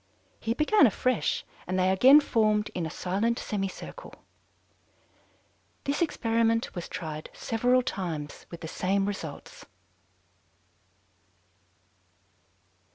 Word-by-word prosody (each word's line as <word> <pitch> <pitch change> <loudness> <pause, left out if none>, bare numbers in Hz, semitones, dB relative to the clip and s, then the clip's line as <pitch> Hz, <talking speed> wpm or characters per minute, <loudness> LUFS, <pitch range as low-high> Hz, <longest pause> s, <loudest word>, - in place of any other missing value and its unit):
He 230 +1 -2
began 305 +3 +5
afresh, 250 +3 0 0.2
and 185 +1 -1
they 185 0 +3
again 265 +10 +7
formed 215 -5 +1
in 170 -3 -2
a - - -6
silent 200 +8 -1
semicircle. 205 - -5 1.7
This 280 +4 -1
experiment 230 -7 +1
was 175 -2 -6
tried 155 -2 -6
several 245 +3 +1
times 170 - -5
with 170 - -9
the 160 - -5
same 195 +4 0
results." 205 -1 -6
210 Hz, 95 wpm, -28 LUFS, 185-245 Hz, 1.7 s, again